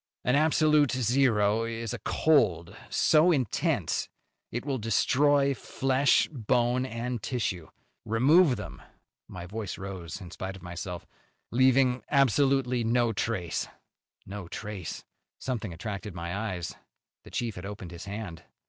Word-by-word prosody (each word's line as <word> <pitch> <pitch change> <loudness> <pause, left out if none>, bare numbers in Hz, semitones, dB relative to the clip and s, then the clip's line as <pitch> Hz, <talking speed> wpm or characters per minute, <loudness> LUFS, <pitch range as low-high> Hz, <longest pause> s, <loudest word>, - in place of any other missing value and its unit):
"An 125 +2 +2
absolute 150 -2 +4
zero 115 -4 +2
is 115 -1 -4
a - - -5
cold 100 - +2
so 165 +2 +4
intense 130 - 0 0.4
it 120 +3 -4
will 135 -3 -1
destroy 140 +6 +3
flesh, 135 +1 +2
bone 125 0 +1
and 120 -1 -4
tissue. 95 -10 -2 0.4
Remove 135 - +4
them," - - -8 0.5
my 85 -1 -8
voice 105 +1 -5
rose 95 -2 -6
in 90 -4 -10
spite 95 +1 -5
of 95 - -13
myself, 90 0 -6 0.5
"leaving 130 0 +4
absolutely 135 -2 +3
no 115 0 +2
trace." 100 -5 -2 0.6
No 100 -2 -7
trace! 100 -2 -6 0.3
Something 115 -7 -3
attracted 100 +2 -6
my 85 +1 -4
eyes. 95 -5 -3 0.5
The - - -13
chief 120 -3 -2
had 90 0 -7
opened 100 -4 -8
his 85 +2 -8
hand. 100 -4 -6
115 Hz, 130 wpm, -28 LUFS, 95-130 Hz, 0.6 s, absolute